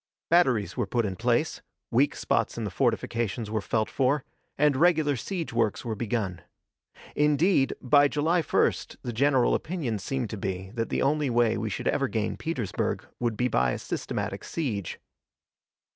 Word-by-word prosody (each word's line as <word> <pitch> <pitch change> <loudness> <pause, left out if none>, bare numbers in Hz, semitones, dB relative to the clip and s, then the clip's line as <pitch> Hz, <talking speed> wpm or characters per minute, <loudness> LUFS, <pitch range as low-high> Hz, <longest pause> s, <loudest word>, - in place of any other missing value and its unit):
Batteries 130 - +3
were 120 -6 -1
put 120 +2 0
in 95 -2 -3
place, 120 - 0 0.3
weak 130 +5 +3
spots - - 0
in - - -3
the - - -3
fortifications 115 -1 -1
were 110 -1 0
felt 110 +1 0
for, 135 +1 +1 0.3
and 150 -1 +4
regular 155 -1 +3
siege 165 - -4
works 115 -2 0
were 115 - -2
begun. 105 -5 -2 0.7
Indeed, 150 0 +3
by 145 +3 +5
July 160 +5 +1
1st - - 0
the 120 - -4
general 130 +1 +3
opinion 150 - -2
seemed 125 +2 -3
to 110 - -4
be 95 0 -4
that 115 -1 -2
the - - 0
only 145 0 +1
way 120 -2 +3
we 110 0 -2
should - - -3
ever 135 - +1
gain 110 -3 -1
Petersburg 130 - -2
would 120 -3 -1
be 125 - +2
by 65 - +2
a - - -2
systematic - - -4
siege. 110 - -3
120 Hz, 165 wpm, -27 LUFS, 110-145 Hz, 0.7 s, by